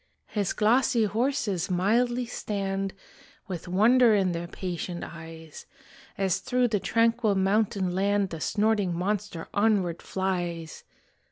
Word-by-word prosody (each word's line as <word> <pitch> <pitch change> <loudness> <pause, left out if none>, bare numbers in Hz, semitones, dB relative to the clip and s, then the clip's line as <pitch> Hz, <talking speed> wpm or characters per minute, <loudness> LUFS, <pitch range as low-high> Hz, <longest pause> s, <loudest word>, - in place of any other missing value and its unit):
His 205 -3 -1
glossy 235 +2 +3
horses 215 -4 0
mildly 240 +7 +1
stand 195 -4 -3 0.5
With 180 -3 -6
wonder 225 +5 +5
in 190 -3 +2
their 170 0 -4
patient 175 -1 -5
eyes, 160 -1 -10 0.5
As 190 -1 +1
through 250 +2 +1
the 210 -2 +1
tranquil 230 0 +2
mountain 195 -1 +1
land 200 +1 +1
The 165 - -5
snorting 205 -3 +1
monster 195 -2 -2
onward 200 -5 +1
flies. 175 -4 -3
195 Hz, 115 wpm, -27 LUFS, 180-220 Hz, 0.5 s, wonder